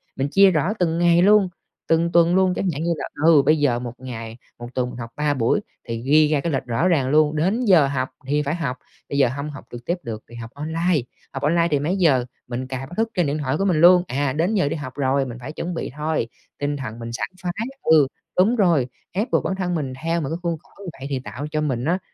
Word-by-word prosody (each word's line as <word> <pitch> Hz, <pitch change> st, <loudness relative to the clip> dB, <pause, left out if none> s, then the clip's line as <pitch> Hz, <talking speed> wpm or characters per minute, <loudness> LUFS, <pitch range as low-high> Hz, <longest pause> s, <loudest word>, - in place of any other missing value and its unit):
Mình 135 Hz, +1 st, -1 dB
chia 195 Hz, +4 st, +6 dB
rõ 165 Hz, +4 st, +1 dB
từng 165 Hz, -2 st, +1 dB
ngày 170 Hz, 0 st, +4 dB
luôn, 200 Hz, 0 st, +5 dB, 0.4 s
từng 165 Hz, +1 st, +2 dB
tuần 170 Hz, +1 st, +4 dB
luôn. 190 Hz, -1 st, +3 dB
Chẳng 190 Hz, -, -1 dB
hạn 145 Hz, +3 st, -4 dB
như 170 Hz, -, 0 dB
là, -, -, -4 dB, 0.2 s
ừ, 160 Hz, -3 st, +7 dB
bây 155 Hz, 0 st, +4 dB
giờ 130 Hz, -5 st, +2 dB
1 120 Hz, -1 st, -6 dB
ngày, 115 Hz, -3 st, -7 dB, 0.2 s
1 120 Hz, -, -7 dB
tuần 125 Hz, -1 st, 0 dB
mình 120 Hz, -, -9 dB
học 115 Hz, 0 st, -6 dB
3 150 Hz, -1 st, +1 dB
buổi 130 Hz, -, +1 dB, 0.3 s
thì 115 Hz, -1 st, -4 dB
ghi 150 Hz, +4 st, +4 dB
ra 150 Hz, -1 st, +1 dB
cái 170 Hz, -, -2 dB
lịch 135 Hz, -, 0 dB
rõ 125 Hz, +8 st, +1 dB
ràng 145 Hz, -8 st, +2 dB
luôn. 150 Hz, +1 st, +3 dB
Đến 195 Hz, +11 st, +1 dB
giờ 175 Hz, -9 st, +6 dB
học 130 Hz, -2 st, -2 dB, 0.2 s
thì 145 Hz, +2 st, +1 dB
phải 145 Hz, +2 st, -1 dB
học. 140 Hz, -7 st, -3 dB, 0.3 s
Bây 140 Hz, -, -2 dB
giờ 135 Hz, -3 st, +4 dB
hông 140 Hz, +4 st, -4 dB
học 145 Hz, -2 st, -10 dB
trực 120 Hz, 0 st, -9 dB
tiếp 175 Hz, -, 0 dB
được 110 Hz, -2 st, -6 dB
thì 120 Hz, -, -12 dB
học 115 Hz, -1 st, -7 dB
online. 160 Hz, +2 st, 0 dB, 0.3 s
Học 135 Hz, -, -5 dB
online 170 Hz, +3 st, +3 dB
thì 145 Hz, -, +2 dB
mấy 165 Hz, +7 st, -1 dB
giờ 140 Hz, -9 st, +3 dB, 0.2 s
mình 125 Hz, +1 st, -4 dB
cài 130 Hz, 0 st, -5 dB
báo -, -, -12 dB
thức 225 Hz, +1 st, +1 dB
trên 175 Hz, -5 st, +1 dB
điện 145 Hz, +2 st, -1 dB
thoại 140 Hz, -1 st, -1 dB
của 195 Hz, -, 0 dB
mình 170 Hz, -5 st, +2 dB
luôn. 180 Hz, +1 st, +7 dB
À, 135 Hz, +1 st, -1 dB
đến 170 Hz, +9 st, 0 dB
giờ 185 Hz, -8 st, +2 dB
đi -, -, -2 dB
học 135 Hz, -5 st, -6 dB
rồi, 135 Hz, -1 st, +1 dB
mình 120 Hz, -2 st, -7 dB
phải 130 Hz, -, -6 dB
chuẩn 170 Hz, +3 st, -4 dB
bị 165 Hz, -, -4 dB
thôi, 155 Hz, -5 st, -1 dB, 0.3 s
tinh 145 Hz, 0 st, -1 dB
thần 120 Hz, -4 st, -6 dB
mình 115 Hz, 0 st, -6 dB
sảng -, -, -3 dB
khoái 175 Hz, -1 st, -2 dB, 0.3 s
ừ, 155 Hz, -4 st, +5 dB, 0.3 s
đúng 200 Hz, +7 st, +4 dB
rồi. 170 Hz, -, +3 dB, 0.2 s
Ép 205 Hz, +6 st, -2 dB
buộc -, -, +2 dB
bản 190 Hz, -, -1 dB
thân 180 Hz, -2 st, -2 dB
mình 140 Hz, -5 st, -3 dB
theo 165 Hz, +1 st, 0 dB
một 135 Hz, -, -3 dB
cái 165 Hz, -, -2 dB
khuôn 170 Hz, -1 st, -1 dB
khổ -, -, -27 dB
như 185 Hz, -, -5 dB
vậy 135 Hz, -, -6 dB
thì 135 Hz, -2 st, -1 dB
tạo 130 Hz, +3 st, -6 dB
cho 155 Hz, -, 0 dB
mình 130 Hz, -5 st, -1 dB
á 175 Hz, +4 st, +1 dB
150 Hz, 270 wpm, -22 LUFS, 130-170 Hz, 0.4 s, ừ